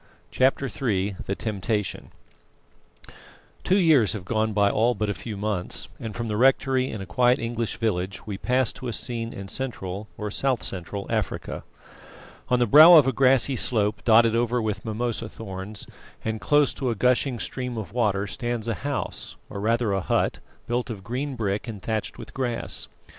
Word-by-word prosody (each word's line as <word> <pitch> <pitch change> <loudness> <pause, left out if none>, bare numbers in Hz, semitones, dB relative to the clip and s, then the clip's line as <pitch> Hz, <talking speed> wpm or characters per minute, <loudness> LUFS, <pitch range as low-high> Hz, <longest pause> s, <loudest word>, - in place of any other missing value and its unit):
CHAPTER 135 +1 +2
III 100 -8 -1
THE 100 - -1
TEMPTATION 105 -2 -3 1.5
Two 190 - +3
years 155 - +4
have 105 -5 -6
gone 110 +1 0
by 100 -1 +3
all 120 +3 +2
but 105 -1 -1
a - - -2
few 105 0 -7
months, 100 -3 -1
and 110 -3 -6
from 120 -1 -3
the 105 -1 -2
rectory 130 +1 +3
in 105 - -5
a - - -5
quiet 120 +8 +3
English 115 -1 -3
village 100 -4 -2
we 100 -2 -5
pass 125 0 +1
to 130 - -7
a 120 - -3
scene 115 -1 -2
in 100 0 -8
Central, 105 -4 -4
or 105 -1 -4
South 130 +1 0
Central, 100 +2 -4
Africa. 110 -5 -2 0.9
On 125 - +4
the 120 - +3
brow 155 +9 +9
of 150 -5 +8
a 135 - +2
grassy 130 0 +3
slope 105 -3 +1
dotted 115 0 +5
over 120 +1 +1
with 105 -3 -2
mimosa 115 0 -2
thorns, 100 -1 -7 0.4
and 110 -1 -2
close 145 +8 +3
to 130 -3 -2
a 115 - 0
gushing 125 +3 +2
stream 125 +1 -4
of 110 -2 -6
water, 105 -5 +1
stands 120 0 -3
a 115 - +1
house, 140 0 -3 0.2
or 100 - -5
rather 115 0 +1
a 95 - 0
hut, - - 0 0.3
built 120 +1 -2
of 105 -4 -6
green 130 +6 -3
brick 105 -2 -2
and 110 -3 -6
thatched 110 -2 -3
with - - -10
grass. 125 -3 -3
115 Hz, 180 wpm, -25 LUFS, 105-125 Hz, 1.5 s, brow